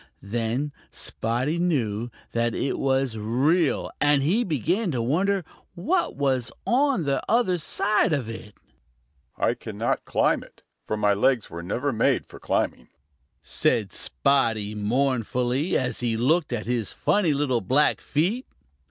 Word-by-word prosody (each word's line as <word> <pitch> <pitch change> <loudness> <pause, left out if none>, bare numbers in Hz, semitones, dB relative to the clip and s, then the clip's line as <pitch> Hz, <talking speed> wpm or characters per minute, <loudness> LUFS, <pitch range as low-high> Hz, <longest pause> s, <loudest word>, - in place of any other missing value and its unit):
Then 120 +7 -2 0.2
Spotty 125 +9 -2
knew 120 -10 0 0.2
that 115 0 0
it 135 - -1
was 135 -4 0
real, 140 +10 +1
and 145 -2 +4
he 200 - +2
began 180 - 0
to 130 -7 -1
wonder 180 +10 +1 0.3
what 340 - 0
was 130 -3 0
on 260 - +2
the 140 -2 0
other 220 -7 +2
side 200 +5 +1
of 140 -7 0
it. 115 -2 -8 0.8
"I - - +2
cannot - - -3
climb - - +2
it, - - -17 0.2
for 110 - -1
my 105 -1 +3
legs 120 +3 +1
were 85 - -6
never 125 +11 -1
made 115 - +2
for - - -13
climbing," - - -1 0.6
said - - 0
Spotty 110 - +1
mournfully 125 - 0
as 130 - -1
he 115 -2 0
looked 150 +7 +2
at 115 -3 -2
his 120 -3 -1
funny 195 -6 +2
little 135 -4 +1
black 135 +10 +2
feet. 195 - -1
135 Hz, 140 wpm, -25 LUFS, 115-165 Hz, 0.8 s, and